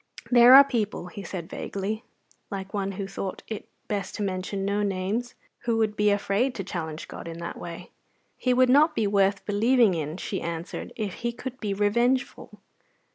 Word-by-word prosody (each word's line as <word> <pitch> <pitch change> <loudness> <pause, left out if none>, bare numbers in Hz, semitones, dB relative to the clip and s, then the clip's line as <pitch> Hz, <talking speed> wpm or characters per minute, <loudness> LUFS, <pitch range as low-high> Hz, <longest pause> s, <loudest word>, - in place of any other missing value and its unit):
"There 245 +1 +9
are 275 - +11
people," 215 -9 -2
he 200 - -8
said 175 -3 -6
vaguely, 205 +6 -4 0.5
like 195 0 -6
one 195 -1 -1
who 195 +1 -4
thought 195 0 -5
it 220 -2 -6 0.2
best 200 -2 -3
to 210 - -2
mention 195 0 -2
no 200 +1 0
names, 200 +4 -2 0.3
who 230 -1 +1
would 215 -2 +1
be 210 0 +3
afraid 205 +5 +1
to 195 - -3
challenge 160 -4 -5
God - - -8
in 165 0 -6
that 170 0 -6
way." 170 +1 -8 0.4
"He 255 - 0
would 255 +1 +5
not 300 +5 +5
be 220 - +1
worth 200 0 +2
believing 225 +1 +4
in," 155 0 -3
she 195 - -4
answered, 170 +1 -5
"if 210 -5 -3
He 235 0 0
could 255 +2 -7
be 205 -2 -2
revengeful. 235 +6 0
205 Hz, 185 wpm, -26 LUFS, 190-235 Hz, 0.5 s, are